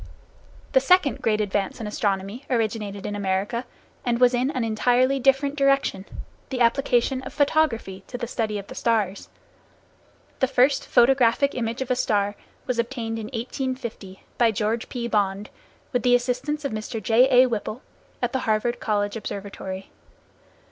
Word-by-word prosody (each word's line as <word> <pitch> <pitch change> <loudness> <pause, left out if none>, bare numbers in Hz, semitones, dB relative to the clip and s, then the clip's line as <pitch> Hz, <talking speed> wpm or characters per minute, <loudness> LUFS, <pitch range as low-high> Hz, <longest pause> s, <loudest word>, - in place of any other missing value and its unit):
The - - +5
second 365 - +3
great 215 -1 +1
advance 200 -1 -1
in 225 - -5
astronomy 205 +3 -2
originated 215 -4 -2
in 205 - -3
America, 200 +5 -1 0.4
and 240 -1 0
was 250 0 +5
in 250 +2 +1
an 260 -5 -2
entirely 245 +4 +2
different 270 +2 +2
direction, 275 -8 +1 0.4
the 260 - -3
application 245 +1 +2
of 270 - -9
photography 280 -10 +1
to 245 - -6
the 240 - -3
study 220 -3 -2
of 200 - -6
the - - -10
stars. 210 -4 -1 1.1
The 260 - +3
first 265 +2 +2
photographic 255 +2 +4
image 235 +1 -2
of 260 - -6
a - - +3
star 205 -4 +1 0.3
was 250 -2 -2
obtained 230 -2 -2
in 220 - -5
1850, 235 -5 -5 0.2
by 235 -1 +5
George 220 +2 -1
P. 240 -2 -3
Bond, 205 -2 -1 0.4
with 245 - +1
the 245 -1 +4
assistance 255 +5 -1
of 280 - -1
Mr. 220 +1 -4
J.A. 250 +4 +5
Whipple, 230 0 -3 0.4
at 245 - 0
the 260 - +1
Harvard 220 +3 +1
College 205 -1 -1
Observatory. 195 -2 -6
235 Hz, 155 wpm, -24 LUFS, 210-255 Hz, 1.1 s, The